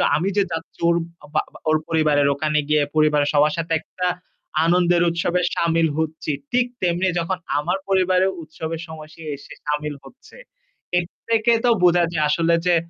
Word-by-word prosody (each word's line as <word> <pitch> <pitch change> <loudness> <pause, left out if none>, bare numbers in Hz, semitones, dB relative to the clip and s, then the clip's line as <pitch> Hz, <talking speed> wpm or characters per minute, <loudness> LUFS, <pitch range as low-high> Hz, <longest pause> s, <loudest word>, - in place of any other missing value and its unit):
আমি 180 +5 0
যে 200 - +5
যাচ্ছি 165 0 -6
ওর 170 - +3 0.4
বা 155 - +3
বা - - -13
ওর 155 - +4
পরিবারের 150 -3 +2
ওখানে 150 +2 0
গিয়ে 150 -1 +3
পরিবারের 150 -2 +3
সবার 150 +1 +4
সাথে 165 0 -2
একটা 180 +2 -4 0.6
আনন্দের 175 0 +3
উৎসবে 170 +1 0
সামিল 165 -1 +2
হচ্ছি। 160 -1 -2 0.2
ঠিক 245 0 +3 0.2
তেমনি 180 +1 +1
যখন 180 +2 -2 0.2
আমার 170 +6 0
পরিবারে 185 -1 +3 0.2
উৎসবের 160 +1 -6
সময় 155 -1 -10
সে - - -14
এসে 140 - -13
সামিল 150 0 -2
হচ্ছে। 260 - -16 0.6
এর 175 - +2 0.2
থেকে 230 +1 +3
তো - - +5
বোঝা 175 0 +5
যায় 155 -3 0
আসলে 165 +2 +2
যে 175 - +5
165 Hz, 170 wpm, -22 LUFS, 155-180 Hz, 0.6 s, যে